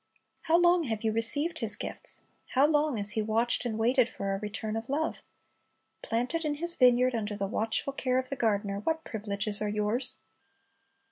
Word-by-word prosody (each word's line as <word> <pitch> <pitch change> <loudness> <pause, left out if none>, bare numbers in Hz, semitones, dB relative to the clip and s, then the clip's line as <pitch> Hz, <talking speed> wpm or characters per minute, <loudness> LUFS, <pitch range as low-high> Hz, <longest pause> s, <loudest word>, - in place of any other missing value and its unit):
How 330 - +6
long 350 -1 +3
have 220 -3 -4
you 220 -1 0
received 290 +9 +1
His 220 -3 +4
gifts? - - -5 0.3
How 270 +2 +5
long 295 -3 +1
has 205 0 +7
He 220 - -1
watched 225 +3 +1
and 220 -2 -3
waited 240 +2 +2
for 195 -4 -4
a 195 - -3
return 215 +1 -4
of 225 +2 -5
love? 310 +3 -2 0.8
Planted 250 +9 -2
in 300 -1 -1
His 340 +3 +1
vineyard, 250 -2 +4
under 210 -3 -3
the 200 - -2
watchful 225 +6 0
care 255 -2 -1
of 255 0 -2
the 275 - -3
gardener, 205 -4 -1
what 320 +9 -2
privileges 205 -1 -3
are 210 - -1
yours! 210 +5 0
230 Hz, 185 wpm, -28 LUFS, 215-275 Hz, 0.8 s, has